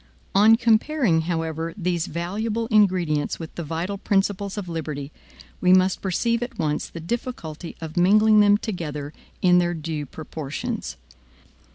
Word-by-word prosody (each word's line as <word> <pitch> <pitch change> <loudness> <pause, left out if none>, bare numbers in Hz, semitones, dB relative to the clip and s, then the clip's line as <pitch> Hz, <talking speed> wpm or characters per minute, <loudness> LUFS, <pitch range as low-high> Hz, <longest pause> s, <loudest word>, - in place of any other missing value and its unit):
On 215 +3 +7
comparing, 230 - +2
however, 165 -1 -2
these 175 -3 -1
valuable 210 +7 -2
ingredients 180 -8 +2
with 165 -1 -8
the - - -5
vital 170 +6 -3
principles 200 0 0
of 200 -3 -4
liberty, 155 -4 -5 0.5
we 180 0 +5
must 185 0 +3
perceive 230 +5 0
at 240 - -5
once 150 -2 -1
the 170 - -8
difficulty 170 -4 -5
of 160 -1 -7
mingling 215 +4 +5
them 205 0 +6
together 150 -9 -5 0.3
in 180 -1 +6
their 175 0 0
due 155 -2 -4
proportions. 155 - -5
180 Hz, 140 wpm, -24 LUFS, 160-210 Hz, 0.5 s, On